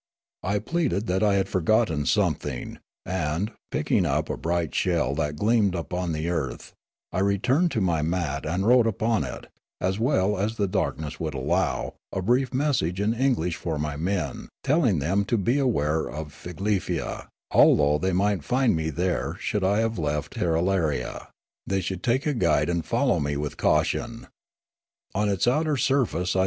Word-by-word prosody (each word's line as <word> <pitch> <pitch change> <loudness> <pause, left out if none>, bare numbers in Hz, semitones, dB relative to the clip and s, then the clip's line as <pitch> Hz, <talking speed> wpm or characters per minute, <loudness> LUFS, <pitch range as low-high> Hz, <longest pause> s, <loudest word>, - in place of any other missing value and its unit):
I 100 +2 0
pleaded 115 - -1
that 95 -2 0
I 105 -2 +3
had 95 - +1
forgotten 90 - +1
some - - +3
thing, 65 -4 -6 0.3
and, 90 +3 -1 0.2
picking - - +1
up - - 0
a - - -2
bright 85 -2 -1
shell 80 -7 +1
that 75 0 -1
gleamed 105 +1 +2
upon 90 +2 -3
the 80 +1 -2
earth, 75 -8 -3 0.4
I - - -1
returned 120 - +2
to 110 - 0
ni) 85 -4 +1
mat 75 -3 -1
and 90 +5 -1
wrote 120 0 +5
upon 110 +1 +1
it, - - -6 0.3
as 95 +3 -1
well 105 -6 +1
as 105 +3 -1
the 100 -3 0
darkness 75 -4 -2
would 80 -3 -3
allow, 65 - 0 0.2
a - - -2
brief 125 +7 +1
message 125 - 0
in 105 +2 +1
English 115 -10 0
for 80 -3 -3
my 75 -1 -2
men, 90 +4 -2
telling 135 - +3
them 85 +8 +1
to 115 - +1
beware 100 - +1
of 75 -1 -6
Figlefia, 95 +4 -3 0.2
although 75 +1 +5
they 95 +3 0
might 95 -2 +1
find 125 - +2
me 80 0 -1
there 90 +3 -1
should 105 - -1
I 100 +3 +3
have 115 -3 -1
left 75 -1 -2
Tirralaria; 80 -5 0 0.4
they 95 0 +1
should 95 0 -4
take 130 +3 +1
a 150 - +1
guide 85 - +2
and 85 -1 0
fol - - +1
low - - +3
me 70 0 -1
with 75 0 -3
caution. - - 0 0.8
On 105 +1 +1
its 100 -3 +1
outer 150 +3 +2
surface 115 - +1
I - - +2
95 Hz, 170 wpm, -25 LUFS, 80-110 Hz, 0.8 s, wrote